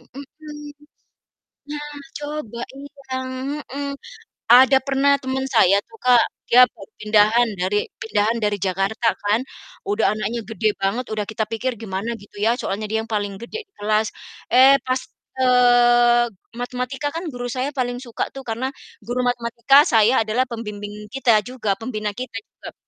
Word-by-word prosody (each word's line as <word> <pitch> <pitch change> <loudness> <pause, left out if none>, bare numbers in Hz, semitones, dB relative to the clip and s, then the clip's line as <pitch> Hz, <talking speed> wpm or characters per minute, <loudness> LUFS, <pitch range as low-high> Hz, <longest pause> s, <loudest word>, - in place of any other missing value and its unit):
mhm. 295 +1 -10 1.0
Nah, 295 0 -6 0.2
coba 290 -6 -6
iya, 285 +1 -10 0.8
heeh. 280 +1 -4 0.6
Ada 260 +2 +8
pernah 275 +1 +2
temen 265 0 -2
saya 220 -7 +4
tuh - - -22
Kak, 245 -2 +5 0.2
dia 250 +1 +7
baru 195 - -14
pindahan 215 +3 +4
dari 190 +3 +1 0.2
pindahan 220 +1 0
dari 210 -1 0
Jakarta 195 +4 -1 0.2
kan, 205 +2 +2 0.5
udah 405 +2 +1
anaknya 215 +3 -2
gede 220 -1 0
banget, 200 +6 0
udah 215 - -1
kita 220 0 -2
pikir 230 +4 -2
gimana 220 +2 -4
gitu 205 0 -11
ya 230 +2 +3
soalnya 210 -1 -3
dia 220 - +1
yang - - -30
paling 205 -2 -2
gede 235 - -7
di - - -53
kelas. 215 +1 +1 0.4
Eh, 260 +2 +7
pas, 255 0 +1 0.4
eee, 240 -1 +5 0.3
matematika 250 +3 -3
kan 335 +2 -4
guru 245 -2 -5
saya 255 +3 -2
paling 245 -2 -2
suka 240 -3 -3
tuh 270 - -7
karena 230 +3 -2 0.4
guru 245 +2 -2
matematika 235 +2 +2
saya 225 -2 +4
adalah 220 +4 +1
pembimbing 210 -3 -7
kita 240 -5 +4
juga, 230 -5 -2
pembina 215 -2 -3
kita 250 +1 -7 0.2
juga. - - -11
240 Hz, 150 wpm, -21 LUFS, 215-260 Hz, 1.0 s, Ada